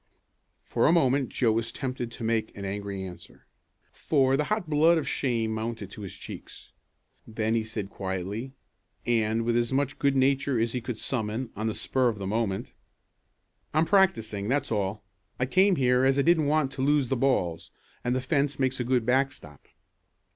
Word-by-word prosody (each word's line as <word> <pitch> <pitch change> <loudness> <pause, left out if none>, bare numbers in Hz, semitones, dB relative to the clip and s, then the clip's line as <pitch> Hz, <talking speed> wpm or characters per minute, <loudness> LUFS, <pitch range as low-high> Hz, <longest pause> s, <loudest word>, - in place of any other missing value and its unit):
For - - +1
a - - +5
moment 135 -5 +3
Joe 120 -4 +1
was 115 +1 -1
tempted 125 -2 -4
to 115 - -8
make 110 -1 -1
an 100 - -5
angry 100 0 -4
answer, 90 -2 -11 0.5
for 135 -3 +2
the 150 +2 0
hot 215 0 -1
blood 160 +3 +4
of 155 - -2
shame 115 -4 0
mounted 110 -2 -4
to 105 - -9
his 95 -3 -7
cheeks. - - -10 0.6
Then 110 0 -1
he 115 -1 +1
said 110 -2 -5
quietly, 100 +7 -4 0.5
and 115 -1 +1
with 120 0 +1
as 120 0 +1
much 140 +1 0
good 140 -1 +2
nature 135 -1 +2
as 115 0 0
he 125 - -2
could 115 -1 -5
summon 115 0 -2
on 110 +2 -2
the 110 - -2
spur 130 -2 +1
of 110 - -4
the 100 - -5
moment: 100 -1 -2 1.0
"I'm 155 +1 +4
practicing, 115 - +2
that's 140 0 0
all. 100 -1 -1 0.4
I 125 - +2
came 190 +7 +4
here 125 -3 +3
as 135 +1 +3
I 140 - +3
didn't 160 -2 +3
want 150 -2 +2
to 135 -1 -5
lose 140 -2 +2
the 135 - +1
balls, 90 -11 0 0.3
and 125 +1 0
the 130 - 0
fence 140 +1 0
makes 130 -1 0
a - - 0
good 125 -1 +1
backstop." 130 - -1
125 Hz, 185 wpm, -27 LUFS, 110-135 Hz, 1.0 s, a